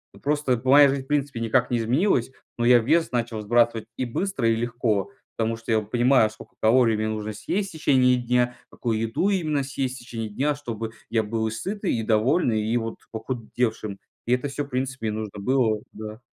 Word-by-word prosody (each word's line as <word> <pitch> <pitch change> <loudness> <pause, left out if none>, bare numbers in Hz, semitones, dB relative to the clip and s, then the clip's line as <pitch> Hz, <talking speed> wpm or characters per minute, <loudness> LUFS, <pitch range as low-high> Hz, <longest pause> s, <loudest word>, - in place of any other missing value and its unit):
Вот - - -18
просто 145 -4 +1
моя 140 +1 +7
жизнь, 135 -1 -1
в - - -21
принципе, 140 -4 -1
никак 120 +2 +2
не 120 - +1
изменилась, 130 - +1 0.3
но 120 - 0
я 120 0 +7
вес 160 +8 +2
начал 120 -2 -2
сбрасывать 115 0 +2
и 130 - -1
быстро, 135 -1 -1
и 115 - +3
легко, 115 -1 -1 0.3
потому 115 0 0
что 115 0 -6
я 110 - +4
вот 105 0 -9
понимаю, 120 -2 +4
сколько 110 - -14
калорий 115 0 +4
мне 110 0 -1
нужно 110 0 -3
съесть 195 - -2
течение 130 -5 +3
дня, 125 0 +1
какую 115 -3 -2
еду 115 - 0
именно 155 -7 0
съесть 130 -1 -3
течение 115 -2 -6
дня, 140 +8 0
чтобы 115 -6 -5 0.2
я 110 -1 +1
был 110 +1 -1
и - - -3
сытый, 195 - -2
и 110 - -2
довольный, 110 +1 +2
и 115 +3 0
вот 115 -1 -4
похудевшим. 110 -3 -3 0.3
И 125 - +3
это 125 +3 0
всё, 145 +1 -3
в - - -15
принципе, 130 -3 -2
мне 105 +1 -3
нужно 105 -1 -6
было, 115 -1 +2
да. 110 +1 -8
120 Hz, 200 wpm, -24 LUFS, 110-135 Hz, 0.3 s, моя